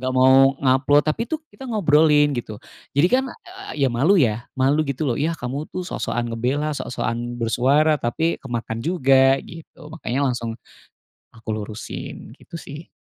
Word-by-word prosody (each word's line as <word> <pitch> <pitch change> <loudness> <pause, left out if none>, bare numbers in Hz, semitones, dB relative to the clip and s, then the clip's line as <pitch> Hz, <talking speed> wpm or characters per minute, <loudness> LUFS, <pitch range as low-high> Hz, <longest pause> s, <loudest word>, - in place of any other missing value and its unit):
nggak 130 0 -2
mau 135 +1 +5
nge-upload, 135 +2 +3
tapi 155 +9 0
itu 315 - -1 0.2
kita 265 -2 -10
ngobrolin, 150 -7 +4
gitu. 110 -3 -5 0.4
Jadi 165 +5 +5
kan, 265 +1 +3
eee, 365 - -8
ya - - +2
malu 155 +12 +3
ya, 120 -6 +1
malu 135 +4 +2
gitu 140 +3 -2
loh, 120 - +1
"Yah 165 +2 0
kamu 135 +5 -5
tuh 185 - -4
sok-sokan 120 -8 -3
ngebela, 135 +6 -1
sok-sokan 120 -3 -4
bersuara 135 +7 +2
tapi 160 +8 -1
kemakan 115 -3 -4
juga." 135 -5 +4
Gitu. 165 -1 -13 0.2
Makanya 140 -3 -2
langsung 115 -1 -5 0.8
aku 115 0 -17
lurusin, 105 0 -7
gitu - - -16
sih. 150 +3 -10
135 Hz, 155 wpm, -22 LUFS, 120-155 Hz, 0.8 s, mau